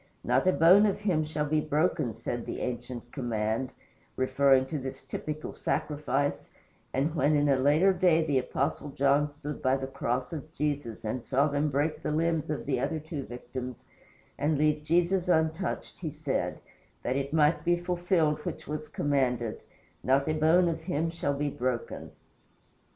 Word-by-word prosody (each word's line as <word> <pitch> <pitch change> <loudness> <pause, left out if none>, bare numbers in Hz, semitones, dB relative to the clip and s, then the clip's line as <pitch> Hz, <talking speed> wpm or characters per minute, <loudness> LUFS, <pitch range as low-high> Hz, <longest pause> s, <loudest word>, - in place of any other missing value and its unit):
"Not - - +2
a - - +7
bone 185 +5 +6
of 205 0 -1
him 180 -7 +1
shall 150 -1 -2
be 155 +1 +1
broken," 150 - 0
said 120 +1 -4
the - - -4
ancient 120 -1 -5
command, 115 -1 -1 0.5
referring 130 0 +3
to 150 +2 -4
this 130 0 -6
typical 155 +3 -5
sacrifice; 145 -1 -1 0.4
and 145 +4 0
when 155 -2 +2
in 145 0 +3
a 140 - +4
later 150 +9 +4
day 175 -3 +3
the 140 -4 +2
Apostle 140 +3 -2
John 140 +2 +2
stood 145 0 -7
by 130 +1 +2
the 135 - -4
cross 130 0 -2
of 155 0 -6
Jesus 145 -8 -3
and 115 +3 -2
saw 135 +3 +2
them 145 +1 0
break 145 +3 0
the - - -2
limbs 160 0 0
of 150 - -3
the 135 -3 0
other 145 +5 -1
two 150 -3 -6
victims 125 0 -7 0.6
and 150 +1 +1
leave 150 0 +2
Jesus 175 +4 +2
untouched, 160 +1 0
he 165 - -3
said, 150 -2 -2 0.5
"that 125 - 0
it 140 0 -2
might 155 +1 +3
be 175 0 +3
fulfilled 175 -3 +1
which - - -6
was 150 +1 -5
commanded, 125 -5 0 0.4
not 135 +3 +2
a 155 - +1
bone 160 +3 +4
of 165 -1 -2
Him 160 +1 -1
shall 145 -4 -1
be 145 0 -1
broken." 125 -2 -3
145 Hz, 170 wpm, -29 LUFS, 135-160 Hz, 0.6 s, a